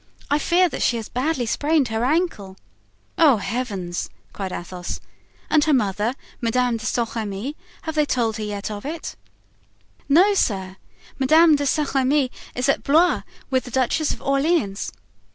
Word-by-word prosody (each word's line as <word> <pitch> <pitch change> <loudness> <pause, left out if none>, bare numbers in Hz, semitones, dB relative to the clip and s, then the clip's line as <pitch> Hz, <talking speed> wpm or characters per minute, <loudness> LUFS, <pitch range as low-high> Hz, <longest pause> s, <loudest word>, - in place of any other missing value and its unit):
I 290 - +3
fear 360 +3 +3
that - - -5
she 235 - +2
has 225 - -6
badly 260 0 -1
sprained 290 +3 +1
her 220 +1 -1
ankle." 255 - 0 0.6
"Oh, 295 -8 +6
heavens!" 200 -5 -3 0.2
cried 195 -2 -4
Athos. 180 0 -5 0.5
"And 305 -2 +3
her 305 -2 +4
mother, 210 +1 0 0.3
Madame 240 0 +1
de 220 0 -5
Saint 235 -2 -1
Remy, 220 +5 -4 0.3
have 320 - -3
they 305 - +2
yet 295 - -1
told 225 -3 +1
her 210 -2 -4
of 205 -1 -6
it?" 315 +3 -5 0.9
"No, 365 +8 +6
sir, 190 - -1 0.4
Madame 315 +4 +6
de 285 0 -1
Saint 295 +1 0
Remy 270 0 +2 0.2
is 250 +2 0
at 275 - +2
Blois 330 +5 +4 0.3
with 260 -1 +1
the - - -7
Duchess 265 +5 +1
of - - -6
Orleans. 275 - +1
255 Hz, 160 wpm, -22 LUFS, 215-300 Hz, 0.9 s, Oh